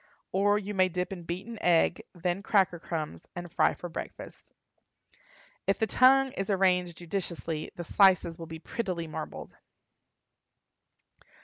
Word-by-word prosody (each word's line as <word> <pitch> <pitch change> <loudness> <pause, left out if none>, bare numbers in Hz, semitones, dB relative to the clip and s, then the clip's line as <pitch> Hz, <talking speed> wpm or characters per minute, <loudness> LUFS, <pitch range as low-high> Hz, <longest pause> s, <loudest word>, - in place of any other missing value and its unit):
Or, 205 +2 +3
you 210 0 -4
may 185 -1 +3
dip 180 +1 -2
in 175 -3 -8
beaten 195 +7 -5
egg, 175 0 +3
then 175 +2 -1
cracker 195 -4 +2
crumbs, 155 - -4
and 175 -1 -6
fry - - +3
for 175 - -7
breakfast. 165 - -9 1.1
If 195 - +3
the 220 - +2
tongue 265 +4 +5
is 195 -3 -4
arranged 180 -3 +2
judiciously 170 -3 -4
the 175 - -5
slices 185 -2 +4
will 165 - -7
be 160 0 -7
prettily 180 -1 -3
marbled. 155 - -7
180 Hz, 135 wpm, -29 LUFS, 170-195 Hz, 1.1 s, tongue